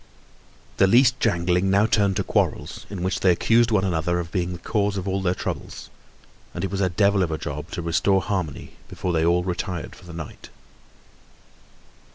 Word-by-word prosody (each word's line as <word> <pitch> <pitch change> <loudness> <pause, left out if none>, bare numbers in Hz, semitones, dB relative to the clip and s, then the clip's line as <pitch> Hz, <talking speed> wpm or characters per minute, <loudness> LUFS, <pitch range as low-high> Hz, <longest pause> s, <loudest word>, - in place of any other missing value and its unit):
The 95 - +5
least 125 +4 +4
jangling 90 -2 +1
now 100 +2 +4
turned 100 -3 +2
to 100 - 0
quarrels, - - -1
in 95 -3 -5
which 95 +1 -1
they 95 - +3
accused 115 +7 +3
one 105 -4 +2
another 85 -1 0
of 85 -1 -5
being 90 0 -1
the 90 - -5
cause 100 +2 -1
of 95 0 -4
all 95 0 -1
their 90 -1 0
troubles, - - -6 0.6
and 85 - -4
it 95 - -2
was 100 0 -2
a 95 - +2
devil 100 +2 +2
of 90 - +1
a 80 - -2
job 75 +2 -6
to 85 - -5
restore 85 +4 +2
harmony 90 -5 -4
before 90 - -3
they 80 -1 +2
all 85 +1 +3
retired 90 -1 -4
for 95 - -16
the 85 - -10
night. 80 -4 -9
95 Hz, 195 wpm, -24 LUFS, 85-100 Hz, 0.6 s, The